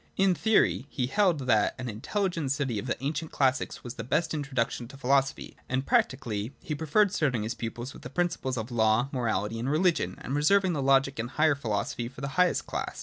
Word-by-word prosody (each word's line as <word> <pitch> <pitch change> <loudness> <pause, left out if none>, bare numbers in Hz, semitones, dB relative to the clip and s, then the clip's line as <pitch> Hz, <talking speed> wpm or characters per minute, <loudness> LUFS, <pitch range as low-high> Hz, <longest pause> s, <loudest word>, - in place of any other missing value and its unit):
In 195 -1 +4
theory, 205 - +2
he 125 - -1
held 175 +1 +2
that 110 -5 +2
an 130 -1 -5
intelligent 165 - -2
study 135 -6 -1
of 120 - -6
the - - -1
ancient 155 +3 -2
classics 135 -1 0
was 120 - -6
the 115 - -6
best 160 +7 0
introduction 130 -5 -2
to 135 +3 -12
philosophy; 135 +1 0
and 130 +1 -1
practically 115 -4 0
he 155 - -5
preferred 160 +7 +2
starting 130 - +1
his 110 +2 -2
pupils 120 +2 -6
with - - -12
the 125 - -8
principles 140 -5 -1
of 115 +2 -4
law, 110 +2 +2
morality 115 -3 -1
and 125 +4 -2
religion, 170 +3 +1
and 130 - -5
reserving 185 +6 +3
the 145 - -1
logic 135 -1 +3
and 115 +1 -2
higher 155 +2 +3
philosophy 115 -2 -2
for 125 +1 -11
the 140 - -3
highest 180 +4 +2
class. - - -4
135 Hz, 205 wpm, -28 LUFS, 120-155 Hz, -, In